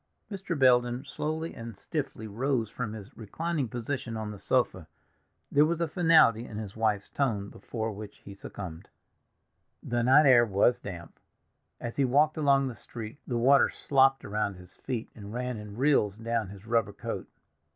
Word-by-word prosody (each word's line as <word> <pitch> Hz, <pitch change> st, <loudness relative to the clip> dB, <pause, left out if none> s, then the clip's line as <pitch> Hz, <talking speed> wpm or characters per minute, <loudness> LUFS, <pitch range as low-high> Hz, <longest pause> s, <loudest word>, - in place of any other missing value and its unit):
Mr. 190 Hz, -4 st, -3 dB
Belden 125 Hz, 0 st, +3 dB
slowly 155 Hz, +3 st, -3 dB
and 115 Hz, -3 st, -8 dB
stiffly 135 Hz, -, -4 dB
rose 115 Hz, 0 st, -1 dB
from 115 Hz, -4 st, -4 dB
his 105 Hz, -2 st, -10 dB
reclining 150 Hz, +6 st, -3 dB
position 120 Hz, 0 st, -4 dB
on 110 Hz, -1 st, -4 dB
the 105 Hz, -, -9 dB
sofa. -, -, 0 dB, 0.6 s
There 145 Hz, -, +5 dB
was 165 Hz, +2 st, +1 dB
a 170 Hz, -, +1 dB
finality 160 Hz, -, +5 dB
in 105 Hz, -, -8 dB
his 105 Hz, -3 st, -6 dB
wife's 110 Hz, -3 st, 0 dB
tone 105 Hz, -8 st, -1 dB
before 110 Hz, -1 st, -5 dB
which 105 Hz, 0 st, -9 dB
he 100 Hz, -, -8 dB
succumbed. 90 Hz, -4 st, -8 dB, 0.9 s
The 120 Hz, 0 st, -1 dB
night 135 Hz, +5 st, +6 dB
air 125 Hz, -3 st, +7 dB
was 115 Hz, +3 st, +2 dB
damp. 90 Hz, -7 st, -9 dB, 0.6 s
As 120 Hz, -, -6 dB
he 140 Hz, -, +3 dB
walked 145 Hz, +5 st, +3 dB
along 140 Hz, -3 st, +3 dB
the 130 Hz, -, -4 dB
street 115 Hz, +3 st, -9 dB
the 120 Hz, -, -1 dB
water 135 Hz, +4 st, +5 dB
slopped 135 Hz, -2 st, +2 dB
around 105 Hz, -1 st, -1 dB
his 90 Hz, 0 st, -13 dB
feet, 120 Hz, -4 st, -4 dB
and 105 Hz, 0 st, -9 dB
ran 125 Hz, -1 st, -3 dB
in 105 Hz, 0 st, -9 dB
rills 125 Hz, -7 st, +2 dB
down 115 Hz, -2 st, -2 dB
his 100 Hz, +1 st, -12 dB
rubber 115 Hz, 0 st, +1 dB
coat. -, -, -5 dB
120 Hz, 170 wpm, -29 LUFS, 105-135 Hz, 0.9 s, air